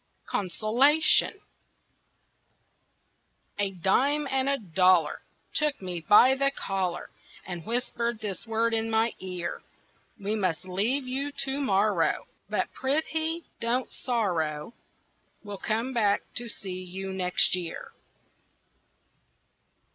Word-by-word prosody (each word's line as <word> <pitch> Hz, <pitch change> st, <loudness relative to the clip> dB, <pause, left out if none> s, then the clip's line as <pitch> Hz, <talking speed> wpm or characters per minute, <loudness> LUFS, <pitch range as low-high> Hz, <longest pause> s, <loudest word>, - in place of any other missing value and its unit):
CONSOLATION 245 Hz, -, +3 dB, 2.2 s
A 200 Hz, -1 st, +2 dB
dime 260 Hz, -, +1 dB
and 265 Hz, 0 st, +1 dB
a 280 Hz, -, +2 dB
dollar 180 Hz, -, +3 dB, 0.3 s
Took 300 Hz, -2 st, +1 dB
me 180 Hz, -2 st, -4 dB
by 220 Hz, +8 st, +7 dB
the 275 Hz, +1 st, +2 dB
collar 190 Hz, -8 st, -3 dB, 0.3 s
And 175 Hz, -3 st, -7 dB
whispered 235 Hz, 0 st, 0 dB
this 210 Hz, 0 st, -5 dB
word 225 Hz, +1 st, +1 dB
in 225 Hz, 0 st, 0 dB
my 225 Hz, +1 st, +2 dB
ear: 180 Hz, -2 st, -5 dB, 0.6 s
"We 205 Hz, +2 st, -2 dB
must 185 Hz, -5 st, -1 dB
leave 225 Hz, +9 st, 0 dB
you 275 Hz, +3 st, -1 dB
to 270 Hz, +1 st, -2 dB
morrow, 195 Hz, -7 st, +2 dB, 0.2 s
But -, -, -1 dB
prithee 315 Hz, +4 st, -1 dB, 0.2 s
don't 245 Hz, +2 st, -1 dB
sorrow, 175 Hz, -, -2 dB, 0.7 s
We'll 205 Hz, -2 st, -7 dB
come 230 Hz, +4 st, -1 dB
back 210 Hz, -4 st, +2 dB
to 240 Hz, -1 st, -1 dB
see 185 Hz, -3 st, -5 dB
you 190 Hz, +1 st, -6 dB
next 180 Hz, -1 st, +3 dB
year." 175 Hz, -3 st, -6 dB
215 Hz, 110 wpm, -27 LUFS, 185-260 Hz, 2.2 s, by